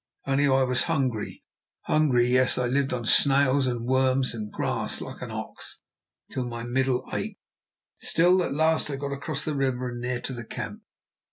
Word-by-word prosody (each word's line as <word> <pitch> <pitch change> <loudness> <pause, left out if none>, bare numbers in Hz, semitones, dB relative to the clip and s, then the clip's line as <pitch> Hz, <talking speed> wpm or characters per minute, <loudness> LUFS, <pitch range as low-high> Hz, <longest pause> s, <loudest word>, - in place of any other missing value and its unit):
Only 140 +1 +2
I 135 -1 +4
was 125 -1 +2
hungry, 130 -10 -2 0.4
hungry; 135 -6 +3
yes, 125 +1 +3
I 125 - +1
lived 135 +2 +1
on 120 -2 -3
snails 135 +1 +4
and 120 -2 -2
worms, 130 0 +2
and 105 -2 -6
grass - - -1
like - - -8
an - - -5
ox, - - -6 0.5
till 130 - -2
my 115 -1 -5
middle 130 +1 0
ached. - - -3 0.6
Still, 180 +2 +3
at - - -2
last 160 +2 +2
I 140 - -2
got 140 +1 -4
across 145 +1 -3
the 155 - -1
river 130 -3 -1
and 120 0 -6
near 125 0 -2
to 130 - -5
the 120 -1 -6
camp. - - -6
130 Hz, 180 wpm, -26 LUFS, 125-140 Hz, 0.6 s, I